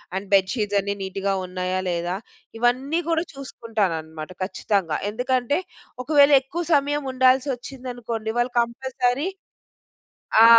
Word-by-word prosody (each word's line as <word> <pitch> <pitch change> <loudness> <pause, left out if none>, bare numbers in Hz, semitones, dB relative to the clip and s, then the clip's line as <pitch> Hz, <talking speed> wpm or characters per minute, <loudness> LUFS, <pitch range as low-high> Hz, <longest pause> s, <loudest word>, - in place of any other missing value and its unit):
And 195 +1 -3
bed 190 -1 +5
sheets 205 -4 0
అన్నీ 200 +1 -1
నీట్‌గా 195 +1 -1
ఉన్నాయా? 185 0 -2
లేదా? 175 +1 -1 0.4
ఇవన్నీ 255 +7 +2
గూడా 330 0 +2
చూసుకుంటాననమాట 185 - -3
ఖచ్చితంగా. 185 -3 0
ఎందుకంటే 250 +5 0 0.4
ఒకవేళ 285 +1 +6
ఎక్కువ 300 +7 -4
సమయం 290 +1 +1
ఉండాల్సి 260 +2 +4
వచ్చిందనుకోండి. 245 -3 -5
వాళ్ళు 245 +1 0
కంపల్సరీ 255 +5 -1 1.1
ఆ! - - +10
240 Hz, 115 wpm, -24 LUFS, 195-265 Hz, 1.1 s, ఆ